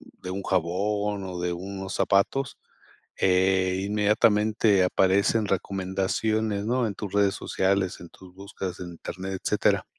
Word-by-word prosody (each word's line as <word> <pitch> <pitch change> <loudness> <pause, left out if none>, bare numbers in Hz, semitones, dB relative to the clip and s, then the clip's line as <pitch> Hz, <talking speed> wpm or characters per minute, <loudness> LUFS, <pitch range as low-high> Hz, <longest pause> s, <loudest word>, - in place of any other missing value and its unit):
de 90 - -11
un 100 +1 -4
jabón 100 +3 -1
o 90 -1 -6
de 90 0 -1
unos 95 +2 -6
zapatos, 120 +7 +1 0.6
eh, 95 0 +2
inmediatamente 105 0 +3
aparecen 100 +4 +2
recomendaciones, 100 +3 -1
¿no? 125 +1 +1
En 100 - -5
tus 100 -3 -6
redes 100 -1 +2
sociales, 95 -1 0
en 85 - -10
tus 90 -1 -16
búsquedas 95 -2 -7
en 90 -1 -6
Internet, 95 +2 -6
etcétera. - - +2
95 Hz, 130 wpm, -26 LUFS, 95-105 Hz, 0.6 s, inmediatamente